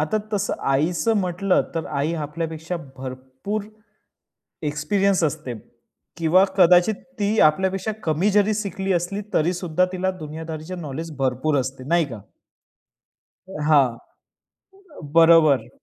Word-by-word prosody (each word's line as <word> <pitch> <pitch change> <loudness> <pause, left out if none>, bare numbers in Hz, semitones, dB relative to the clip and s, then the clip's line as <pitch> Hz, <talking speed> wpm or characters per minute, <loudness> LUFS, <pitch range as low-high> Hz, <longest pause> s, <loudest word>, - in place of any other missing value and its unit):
आता 155 +8 0 0.2
तसं 205 -1 0 0.2
आईचं 170 +11 +1
म्हटलं, 180 +1 +1
तर 165 - -2
आई 145 +2 -1
आपल्यापेक्षा 160 +2 -4 0.2
भरपूर 130 +10 -5 1.0
एक्सपिरियन्स 180 +6 +1
असते 135 -4 -2 0.6
किंवा 170 +3 +4
कदाचित 180 +3 +5 0.2
ती 205 +2 +1
आपल्यापेक्षा 190 +6 -1
कमी 160 +5 +1
जरी 210 +1 +3
शिकली 195 -2 -2
असली 175 +4 -1
तरीसुद्धा 175 +1 +1
तिला 190 +1 0
दुनियादारीचा 160 +2 -6
नॉलेज 160 -1 -6
भरपूर 135 +3 0
असते. 130 0 -5
नाही 170 +1 +3
का? 120 -6 -8 1.3
अ, 190 -5 -8
हां. 140 -5 +5 1.2
बरोबर. 165 -6 +5
165 Hz, 110 wpm, -23 LUFS, 150-190 Hz, 1.3 s, कदाचित